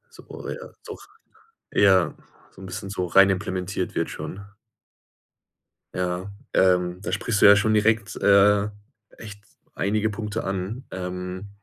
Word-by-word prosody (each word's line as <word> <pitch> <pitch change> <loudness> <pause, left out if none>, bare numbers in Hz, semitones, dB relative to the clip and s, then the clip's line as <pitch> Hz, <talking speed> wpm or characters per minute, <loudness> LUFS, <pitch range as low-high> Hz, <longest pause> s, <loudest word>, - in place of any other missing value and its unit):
So, - - -14 0.2
ja, 485 0 -7 0.2
doch, - - -10 0.6
ja 95 -3 +4 0.4
so 95 - -15
'n - - -8
bisschen 95 +1 -6
so 95 -2 -3
rein 95 +3 +5
implementiert 95 0 -3
wird - - -1
schon. 100 - -7 1.6
Ja, 90 +2 -3 0.2
ähm, 90 -1 +2
da - - -4
sprichst 110 -3 -1
du - - +7
ja 100 - +9
schon 110 +1 +2
direkt, 105 -1 +1
äh, 100 +1 +4 0.5
echt 105 -2 -11 0.3
einige 105 +2 0
Punkte 105 +1 -4
an. 95 +6 -4
Ähm 90 +1 -6
100 Hz, 135 wpm, -24 LUFS, 90-105 Hz, 1.6 s, ja